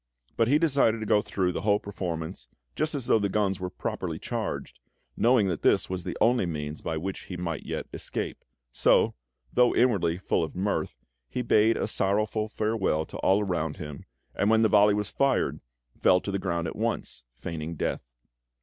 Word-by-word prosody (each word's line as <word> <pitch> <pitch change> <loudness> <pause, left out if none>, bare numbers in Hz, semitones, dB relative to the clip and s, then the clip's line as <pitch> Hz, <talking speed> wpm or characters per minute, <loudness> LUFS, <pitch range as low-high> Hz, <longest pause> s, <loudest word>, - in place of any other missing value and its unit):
But 115 - +2
he 140 +4 +5
decided 140 -8 +3
to - - -3
go 105 0 +4
through 95 -3 -1
the - - -3
whole 105 0 +3
performance 85 -9 -5 0.3
just 155 0 -1
as 135 -4 -3
though 115 - +4
the 100 -1 0
guns 100 -1 0
were 90 0 -3
properly - - -4
charged, - - -4 0.4
knowing 120 -3 +4
that 85 - -2
this - - +3
was 90 -1 -3
the - - -4
only 120 -5 +3
means 75 -2 -4
by 80 - -2
which 95 +4 -5
he 90 - -6
might 85 -3 -4
yet - - -3
escape; - - -4 0.3
so, - - +3 0.4
though 125 -1 +4
inwardly 95 -9 +2
full 90 - 0
of 80 - -5
mirth, 100 +3 -1 0.3
he 125 - -2
bade 110 0 +4
a - - -1
sorrowful 105 +2 0
farewell 105 -8 0
to - - -8
all 95 +2 +3
around 85 -5 -2
him, 75 -5 -8 0.3
and 100 - +1
when 110 0 +4
the 110 - +4
volley 105 0 +5
was 105 -1 -2
fired, 140 -2 +1 0.4
fell 90 - +5
to 100 - -5
the 100 - -1
ground 85 -3 -1
at - - -4
once, 65 -1 -2
feigning 80 +3 -5
death. - - -3
100 Hz, 190 wpm, -27 LUFS, 85-110 Hz, 0.4 s, he